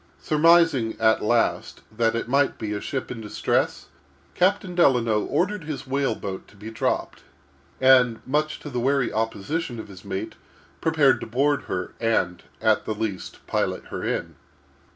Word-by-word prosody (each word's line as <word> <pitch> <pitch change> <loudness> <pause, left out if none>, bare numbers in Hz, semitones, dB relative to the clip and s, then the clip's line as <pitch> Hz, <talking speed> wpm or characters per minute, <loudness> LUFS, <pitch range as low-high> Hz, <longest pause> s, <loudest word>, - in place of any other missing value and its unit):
Surmising, 155 -6 +3
at 110 0 +3
last, 115 +1 0
that 115 0 +1
it 115 - -2
might 140 +2 +2
be 105 -2 -4
a 105 - -4
ship 135 -2 -4
in 120 -2 -6
distress, 105 - -1 0.5
Captain 185 0 +1
Delano 120 -10 +3
ordered 185 -1 -1
his 140 -4 -5
whale 135 -3 0
boat 95 -3 -6
to - - -20
be 105 +2 -9
dropped, 110 - -2 0.6
and, 130 -3 +5
much 150 +3 -1
to 150 - -8
the 125 - -2
wary 135 0 +1
opposition 115 +5 -2
of 110 - -8
his 95 -2 -12
mate, 95 0 -4 0.5
prepared 155 -4 +3
to - - -5
board 140 +5 +1
her, 90 0 -4
and, 100 -6 0 0.2
at - - +2
the 110 - -2
least, 105 -4 -5
pilot - - -1
her - - -5
in. - - -2
125 Hz, 160 wpm, -24 LUFS, 110-145 Hz, 0.6 s, and